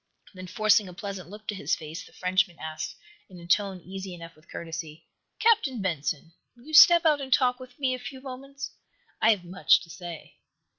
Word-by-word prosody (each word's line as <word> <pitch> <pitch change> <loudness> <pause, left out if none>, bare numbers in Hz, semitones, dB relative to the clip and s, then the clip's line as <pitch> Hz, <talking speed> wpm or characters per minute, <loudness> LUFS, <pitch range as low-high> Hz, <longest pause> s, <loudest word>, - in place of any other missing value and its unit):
Then, 185 -1 -9
forcing 210 0 +3
a 180 - -11
pleasant 195 -2 -6
look 210 +2 -11
to - - -1
his 185 -4 0
face, 155 +2 -8
the - - -16
Frenchman 185 -1 0
asked, 160 +2 -5 0.3
in 180 -2 -12
a 170 - -11
tone 195 +1 +1
easy 190 +1 -7
enough 165 -1 -11
with 155 +2 -24
courtesy: 160 -1 -7 0.3
"Captain 430 - +3
Benson, 165 -3 -2 0.2
will 240 - -18
you 315 - -10
step 340 +2 +9
out 300 -3 +4
and 265 -1 -6
talk 250 0 +3
with 255 -1 -12
me 265 -2 0
a 255 - -4
few 250 +2 -8
moments? 275 +1 -8 0.5
I 220 - +5
have 205 -5 +3
much 180 +2 +4
to 170 - -13
say." 175 -3 -9
190 Hz, 200 wpm, -27 LUFS, 170-255 Hz, 0.5 s, step